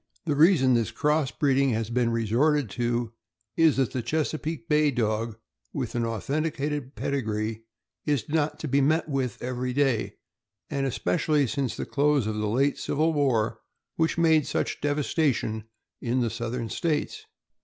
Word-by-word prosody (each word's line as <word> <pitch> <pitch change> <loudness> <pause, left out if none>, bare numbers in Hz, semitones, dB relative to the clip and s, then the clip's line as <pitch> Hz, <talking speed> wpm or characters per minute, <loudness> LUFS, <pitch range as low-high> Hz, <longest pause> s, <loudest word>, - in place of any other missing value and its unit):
The 150 -3 0
reason 150 -4 +5
this 115 -3 +2
cross 150 +4 +1
breeding 140 -2 +2
has 110 0 -2
been 120 -1 +2
resorted 115 +3 +1
to 120 0 -1 0.4
is 160 -4 +4
that 135 -2 +1
the 130 - -2
Chesapeake 155 +5 -2
Bay 150 -1 +3
Dog, 115 -3 -1 0.4
with 125 -5 -3
an 120 -2 0
authenticated 145 +3 -2
pedigree, 110 -4 -2 0.4
is 140 -7 0
not 150 0 0
to 155 - -3
be 140 +1 +2
met 155 +4 +2
with 135 -6 -2
every 125 0 -2
day, 135 -4 +1 0.6
and 140 -1 0
especially 140 - +1
since 135 -1 -2
the - - -3
close 145 -3 +2
of 110 0 -2
the 105 0 -1
late 135 +6 +1
civil 160 +3 +1
war, 115 -7 +1 0.4
which 165 0 +1
made 160 -3 +4
such - - -2
devastation 145 -6 0 0.4
in 125 +1 0
the 115 -2 0
Southern 115 +1 -3
States. 165 - -2
135 Hz, 155 wpm, -26 LUFS, 115-150 Hz, 0.6 s, reason